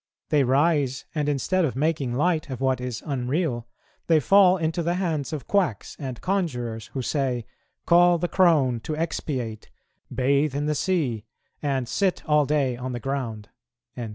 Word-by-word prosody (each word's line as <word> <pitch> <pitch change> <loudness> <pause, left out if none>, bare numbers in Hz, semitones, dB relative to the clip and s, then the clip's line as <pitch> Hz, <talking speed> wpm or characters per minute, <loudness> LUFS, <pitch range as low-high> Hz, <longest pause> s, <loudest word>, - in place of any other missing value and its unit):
They 150 -2 +3
rise, 140 0 +1
and, 150 -2 0
instead 175 +6 +1
of 140 -7 -1
making 140 -4 0
light 155 +1 +1
of 130 -3 -5
what 130 -2 +1
is 125 -3 -5
unreal, 130 -2 -1 0.4
they 160 -2 +5
fall 190 +4 +5
into 165 0 -1
the 170 +1 0
hands 165 -6 -2
of 155 -4 -5
quacks 185 - 0
and 130 -4 -5
conjurers, 125 - -2
who 130 - -3
say, 130 -4 -1 0.4
'Call 175 0 +5
the 175 - -1
crone 155 -11 +3
to 155 +6 -5
expiate, 130 -9 -3 0.4
bathe 140 +2 +1
in 145 +1 -1
the 150 - +1
sea, 140 - -1 0.4
and 135 -4 -1
sit 190 - 0
all 150 -2 +3
day 140 -4 +1
on 125 +1 -5
the 120 - -3
ground.'" 115 -5 -4
145 Hz, 160 wpm, -25 LUFS, 125-165 Hz, 0.4 s, they